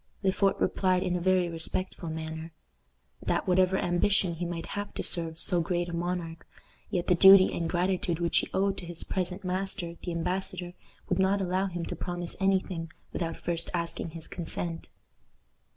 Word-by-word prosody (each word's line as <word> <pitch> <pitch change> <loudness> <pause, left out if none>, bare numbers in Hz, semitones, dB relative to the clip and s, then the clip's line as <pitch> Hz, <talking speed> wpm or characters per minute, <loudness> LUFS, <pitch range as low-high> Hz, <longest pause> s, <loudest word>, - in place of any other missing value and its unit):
Le 190 - +4
Fort 195 +1 +1
replied 185 -1 +2
in 180 - 0
a 180 - -1
very 185 0 +3
respectful 170 +1 -3
manner, 160 +1 -5 0.7
"That, - - -1
whatever 185 +1 +4
ambition 175 +1 +2
he 170 +1 -3
might 170 -1 -4
have 205 0 -4
to - - -2
serve 165 -2 -1
so 175 0 +4
great 175 +1 -1
a - - -6
monarch, 170 -1 -3 0.4
yet 175 -3 -1
the - - +4
duty 190 +2 +8
and 165 -1 -1
gratitude 180 -1 0
which 170 -1 +3
he - - -3
owed 195 0 +1
to 175 - -9
his 175 -1 -6
present 185 0 -2
master, 185 -1 -2
the 175 - -4
embassador, 180 +1 -3 0.3
would 180 - 0
not 190 +1 +3
allow 190 +1 0
him 175 -2 -4
to - - -4
promise 175 -1 -3
any 195 0 +4
thing 165 -4 -6 0.2
without 165 -2 -2
first 170 -1 -1
asking 170 0 -2
his 160 0 -7
consent." 170 -1 -2
175 Hz, 180 wpm, -29 LUFS, 170-185 Hz, 0.7 s, duty